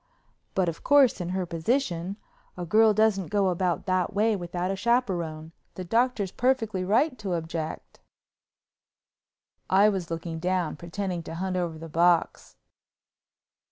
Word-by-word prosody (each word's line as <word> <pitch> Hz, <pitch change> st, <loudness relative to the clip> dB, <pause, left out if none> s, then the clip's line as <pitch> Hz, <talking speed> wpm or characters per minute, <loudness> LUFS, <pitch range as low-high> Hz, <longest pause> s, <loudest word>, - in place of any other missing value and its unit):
But, 185 Hz, -2 st, +2 dB
of 165 Hz, -1 st, -4 dB
course, 280 Hz, -8 st, +4 dB
in 175 Hz, -, -4 dB
her 185 Hz, 0 st, -1 dB
position, 175 Hz, +1 st, -1 dB, 0.4 s
a 175 Hz, -, -4 dB
girl 220 Hz, +5 st, +5 dB
doesn't 210 Hz, -4 st, +2 dB
go 200 Hz, -2 st, +1 dB
about 180 Hz, -1 st, -1 dB
that 185 Hz, -1 st, 0 dB
way 215 Hz, +1 st, +2 dB
without 175 Hz, 0 st, -3 dB
a -, -, -1 dB
chaperone. 175 Hz, -9 st, -1 dB, 0.2 s
The 185 Hz, -, -5 dB
Doctor's 225 Hz, 0 st, 0 dB
perfectly 225 Hz, -7 st, 0 dB
right 240 Hz, -, +2 dB
to 195 Hz, -4 st, -3 dB
object." 160 Hz, -1 st, -5 dB, 1.7 s
I 200 Hz, +3 st, +5 dB
was 190 Hz, -5 st, -3 dB
looking 165 Hz, 0 st, -5 dB
down, 180 Hz, -1 st, -1 dB
pretending 175 Hz, +2 st, -4 dB
to 165 Hz, -, -8 dB
hunt 185 Hz, +2 st, -3 dB
over 170 Hz, -3 st, -2 dB
the 165 Hz, +1 st, -8 dB
box. 170 Hz, +2 st, +1 dB
185 Hz, 140 wpm, -26 LUFS, 170-210 Hz, 1.7 s, girl